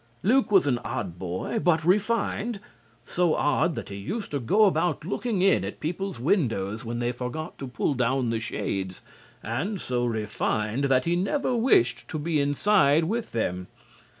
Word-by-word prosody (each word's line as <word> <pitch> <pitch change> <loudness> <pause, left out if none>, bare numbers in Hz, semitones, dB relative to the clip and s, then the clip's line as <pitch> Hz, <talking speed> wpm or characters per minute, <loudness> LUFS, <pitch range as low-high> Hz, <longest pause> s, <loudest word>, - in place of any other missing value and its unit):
Luke 250 +3 +3
was 195 -5 +5
an 125 -4 +1
odd 100 -10 -5
boy 95 - -3
but 165 -5 +2
refined. 210 +3 +1 0.5
So 175 +2 +1
odd 155 +2 +1
that - - -6
he 100 - -6
used 200 - -5
to 145 - -1
go 200 - +4
about 175 -5 +1
looking 205 0 -1
in 195 - +4
at - - -6
people's 180 +1 -3
windows 115 - 0
when 120 0 -4
they 120 0 0
forgot 125 +7 -6
to 135 - -5
pull 125 +3 -1
down 125 -1 0
the 115 - 0
shades, 95 -4 -4 0.4
and 160 - -2
so 125 -5 -1
refined 110 +2 -1
that 130 -2 +2
he 170 - +2
never 245 +8 0
wished 230 - +3
to - - -4
be 155 0 0
inside 145 +1 +3
with 225 +7 -2
them. 90 -5 -2
145 Hz, 170 wpm, -26 LUFS, 115-195 Hz, 0.5 s, was